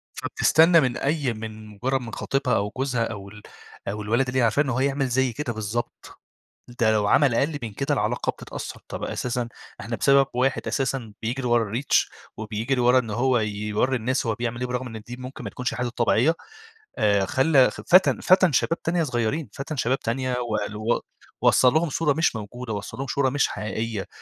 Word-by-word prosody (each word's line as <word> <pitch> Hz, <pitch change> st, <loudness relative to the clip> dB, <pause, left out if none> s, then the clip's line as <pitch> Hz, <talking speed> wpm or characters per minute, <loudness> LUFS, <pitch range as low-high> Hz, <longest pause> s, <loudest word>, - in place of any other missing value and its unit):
فبتستنى 165 Hz, +1 st, +4 dB
من 125 Hz, -2 st, 0 dB
أي 140 Hz, -3 st, 0 dB
من 110 Hz, 0 st, -8 dB
مجرّد 125 Hz, +6 st, -2 dB
من 115 Hz, -2 st, -8 dB
خطيبها 135 Hz, -2 st, 0 dB
أو 100 Hz, +1 st, -1 dB
جوزها 130 Hz, -3 st, 0 dB
أو 100 Hz, -4 st, -6 dB
ال 105 Hz, +1 st, -13 dB, 0.5 s
أو 105 Hz, +1 st, -3 dB
الولد 120 Hz, +5 st, +1 dB
اللي 130 Hz, -, -1 dB
هي -, -, +4 dB
عارفاه 115 Hz, +5 st, +3 dB
إن 145 Hz, -, -5 dB
هو 130 Hz, +1 st, 0 dB
يعمِل 140 Hz, 0 st, +1 dB
زي 130 Hz, 0 st, +1 dB
كده 125 Hz, 0 st, -3 dB
بالضبط، 110 Hz, +2 st, -5 dB, 0.6 s
ده 110 Hz, -1 st, +4 dB
لو 105 Hz, -1 st, +2 dB
عمل 135 Hz, +3 st, +4 dB
أقل 145 Hz, +5 st, 0 dB
من 110 Hz, -3 st, -5 dB
كده -, -, -1 dB
العلاقة -, -, 0 dB
بتتأثّر -, -, -8 dB
طَب -, -, -5 dB
أساسًا 125 Hz, -1 st, -2 dB, 0.3 s
إحنا -, -, -4 dB
بسبب 140 Hz, -1 st, +4 dB
واحد 130 Hz, +2 st, 0 dB
أساسًا 130 Hz, -5 st, -2 dB
بيجري 125 Hz, +3 st, -2 dB
ورا 115 Hz, -3 st, +1 dB
الReach 130 Hz, +5 st, +2 dB, 0.3 s
وبيجري 110 Hz, +4 st, -2 dB
ورا 125 Hz, +1 st, +5 dB
إن 115 Hz, -4 st, -2 dB
هو 125 Hz, +4 st, +2 dB
ي 110 Hz, -1 st, 0 dB
يورّي 105 Hz, +5 st, -1 dB
الناس 125 Hz, +2 st, -1 dB
هو 110 Hz, -, +1 dB
بيعمِل 120 Hz, +1 st, -4 dB
إيه 125 Hz, -, -1 dB
برغم 125 Hz, +1 st, -3 dB
إن -, -, -7 dB
دي 120 Hz, 0 st, -7 dB
ممكن 130 Hz, +2 st, -8 dB
ما -, -, -4 dB
تكونش 125 Hz, +1 st, -3 dB
حياته 125 Hz, +1 st, -2 dB
الطبيعية، 120 Hz, +5 st, +2 dB, 0.6 s
آآ 100 Hz, -2 st, +3 dB
خلّى 130 Hz, +4 st, +4 dB
ف -, -, -9 dB
فَتَن 185 Hz, +2 st, +5 dB
فَتَن 185 Hz, -2 st, +4 dB
شباب 165 Hz, +5 st, +1 dB
تانية 165 Hz, 0 st, 0 dB
صغيّرين، 130 Hz, +3 st, -1 dB
فَتَن 140 Hz, +3 st, -5 dB
شباب 130 Hz, +2 st, +1 dB
تانية 130 Hz, +2 st, -2 dB
وقل 105 Hz, -3 st, -2 dB
و 110 Hz, +3 st, 0 dB, 0.4 s
وصّل 125 Hz, 0 st, +5 dB
لهم 160 Hz, +1 st, +2 dB
صورة 150 Hz, +1 st, +1 dB
مش 160 Hz, -3 st, +1 dB
موجودة، 110 Hz, +2 st, -6 dB
وصّل 100 Hz, +3 st, -6 dB
لهم 135 Hz, -, -4 dB
شورة 135 Hz, -1 st, +1 dB
مش 145 Hz, +2 st, +2 dB
حقيقية، 105 Hz, 0 st, -4 dB
125 Hz, 200 wpm, -24 LUFS, 110-135 Hz, 0.6 s, ورا